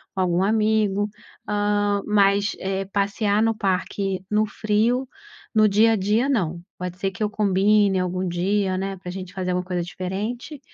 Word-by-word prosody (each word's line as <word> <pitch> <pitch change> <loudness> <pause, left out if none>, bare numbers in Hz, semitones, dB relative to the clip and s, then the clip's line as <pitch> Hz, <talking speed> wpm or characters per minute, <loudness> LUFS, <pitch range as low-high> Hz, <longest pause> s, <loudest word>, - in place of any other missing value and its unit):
com 190 - 0
algum 180 0 +2
amigo, 210 -1 +2 0.4
ah, 205 -1 +1
mas, 200 0 +3
eh, 195 0 -2
passear 205 +2 0
no 225 -1 +2
parque 195 -1 -2
no 210 +1 +2
frio, 225 +5 0 0.5
no 215 -1 +5
dia 220 +3 +4
a - - +3
dia, 210 +6 +1
não, 175 - 0 0.2
pode 180 0 -5
ser 195 0 -1
que 195 - -12
eu 210 - +1
combine 200 -1 +3
algum 185 0 -1
dia, 190 +2 0
né, 195 0 -3
pra 180 -1 -7
gente 185 -1 -7
fazer 185 -1 -2
uma 180 0 -1
coisa 180 -1 -2
diferente, 210 - -5
200 Hz, 170 wpm, -23 LUFS, 185-210 Hz, 0.5 s, no